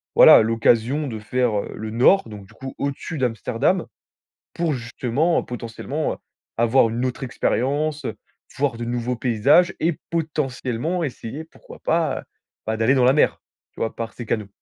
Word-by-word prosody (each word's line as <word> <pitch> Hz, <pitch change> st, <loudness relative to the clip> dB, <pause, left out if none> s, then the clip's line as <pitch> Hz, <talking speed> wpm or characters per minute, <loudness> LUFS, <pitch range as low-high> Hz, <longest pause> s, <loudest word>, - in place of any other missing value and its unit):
voilà, -, -, +9 dB
l'occasion 115 Hz, +5 st, +2 dB
de 110 Hz, -3 st, -5 dB
faire, 115 Hz, 0 st, 0 dB
heu, -, -, -8 dB
le 110 Hz, 0 st, -5 dB
nord, 120 Hz, -, +4 dB
donc 105 Hz, -2 st, -9 dB
du -, -, -19 dB
coup 135 Hz, 0 st, -8 dB
au-dessus 140 Hz, +3 st, -4 dB
d'Amsterdam. 120 Hz, -5 st, 0 dB, 0.7 s
Pour 170 Hz, -2 st, 0 dB
justement, 130 Hz, +6 st, 0 dB
heu, -, -, -9 dB
potentiellement, 125 Hz, +5 st, -4 dB
heu, -, -, -14 dB, 0.4 s
avoir 115 Hz, +1 st, +4 dB
une 120 Hz, +3 st, -2 dB
autre 130 Hz, +2 st, -3 dB
expérience, 145 Hz, +4 st, -1 dB
heu, -, -, -3 dB, 0.4 s
voir 135 Hz, -4 st, 0 dB
de 120 Hz, -, -3 dB
nouveaux 120 Hz, +1 st, -2 dB
paysages 130 Hz, -, +3 dB
et 165 Hz, -1 st, 0 dB
potentiellement 155 Hz, 0 st, -2 dB
essayer, 135 Hz, +2 st, -6 dB
pourquoi 160 Hz, -, -15 dB
pas, 160 Hz, -3 st, 0 dB
heu, -, -, -18 dB, 0.4 s
bah 110 Hz, 0 st, -1 dB
d'aller 115 Hz, +4 st, +3 dB
dans 130 Hz, -2 st, +3 dB
la 130 Hz, -, +6 dB
mer! 150 Hz, -, +2 dB, 0.3 s
Tu -, -, -15 dB
vois? 115 Hz, -, -1 dB
Par 115 Hz, -1 st, -5 dB
ces 120 Hz, -, -8 dB
canaux. 105 Hz, -3 st, -2 dB
125 Hz, 170 wpm, -22 LUFS, 115-150 Hz, 0.7 s, voilà